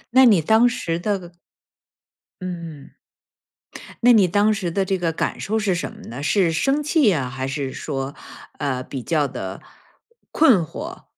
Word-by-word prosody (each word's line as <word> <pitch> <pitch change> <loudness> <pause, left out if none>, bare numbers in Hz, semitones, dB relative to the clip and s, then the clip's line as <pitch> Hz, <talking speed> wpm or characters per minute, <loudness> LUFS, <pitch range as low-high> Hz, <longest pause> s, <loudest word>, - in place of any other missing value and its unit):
那 260 - +8
你 205 -8 +5
当 220 +9 +4
时 170 -8 -3
的 185 -2 -3 1.1
嗯。 165 -5 -7 1.1
那 245 - +8
你 210 -6 +6
当 205 +4 +3
时 195 -4 -2
的 195 +4 0
这 190 0 -1
个 170 -2 -1
感 - - -2
受 220 +2 -1
是 200 -4 +1
什 170 - -3
么 - - -14
呢？ 125 +5 -7
是 170 +2 +2
生 275 - +1
气 300 - +3
啊， 130 -6 -2
还 130 0 -4
是 135 -1 -3
说， 135 -2 -4 0.4
呃， 130 -3 -2
比 130 -1 -6
较 150 -1 0
地 95 -7 -6 0.7
困 260 - +5
惑？ 320 - -8
175 Hz, 170 characters per minute, -22 LUFS, 145-215 Hz, 1.1 s, 那